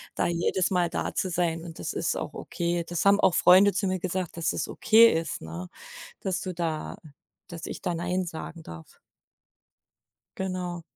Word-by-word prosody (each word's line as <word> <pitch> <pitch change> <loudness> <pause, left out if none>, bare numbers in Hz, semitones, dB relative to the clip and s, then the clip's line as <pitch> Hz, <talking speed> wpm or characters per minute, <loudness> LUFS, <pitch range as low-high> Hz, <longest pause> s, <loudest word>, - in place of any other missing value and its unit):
da - - +1
jedes 175 +2 0
Mal 180 -2 +2
da 170 - -3
zu 190 - -1
sein 165 -2 -1
und 165 -2 -9
das - - -4
ist - - -1
auch - - -5
okay. 170 0 -2
Das 175 +1 -2
haben 200 +1 +6
auch 175 - +4
Freunde 190 +3 +7
zu 200 +1 -1
mir 185 0 -1
gesagt, 185 -1 -3
dass 170 -1 0
es - - -2
okay 230 +1 +5
ist, 165 -2 -3
ne, 85 +3 -7 0.5
dass 190 -1 -2
du 185 -1 -5
da 165 -2 -3 0.5
dass 165 -1 -7
ich - - -6
da 175 - -1
Nein 180 +2 -1
sagen 165 0 -7
darf. 80 - -12 1.4
Genau. 180 -2 -3
175 Hz, 180 wpm, -27 LUFS, 165-185 Hz, 1.4 s, Freunde